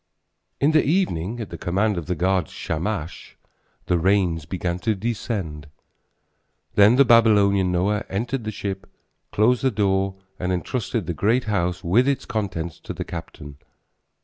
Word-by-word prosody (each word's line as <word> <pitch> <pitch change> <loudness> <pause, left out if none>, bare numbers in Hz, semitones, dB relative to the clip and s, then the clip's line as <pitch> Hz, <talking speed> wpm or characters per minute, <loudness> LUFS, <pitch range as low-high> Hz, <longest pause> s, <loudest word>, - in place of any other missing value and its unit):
In 145 +3 +3
the 155 -1 +4
evening 120 - 0
at 110 - -6
the - - -7
command 100 +4 0
of 85 -4 -5
the 90 - -1
god 90 -1 +1
Shamash 85 0 -4 0.5
the 90 - +1
rains 90 -4 +1
began 90 +1 -3
to 110 +3 0
descend. 95 -8 -4 1.1
Then 105 +3 +6
the 140 +1 +6
Babylonian 100 -5 +4
Noah 100 +4 0
entered 120 +5 -2
the 110 - -3
ship 100 -1 -5
and - - -31 0.4
closed 115 +4 +3
the 135 - +3
door 95 -3 0 0.2
and 90 0 -1
entrusted 110 +3 -2
the 85 - -2
great 115 +9 +1
house 90 -4 -1
with 115 +10 +3
its 140 -1 0
contents 90 -7 -3
to - - -7
the - - -4
captain. 75 -4 -8
100 Hz, 155 wpm, -23 LUFS, 90-115 Hz, 1.1 s, Then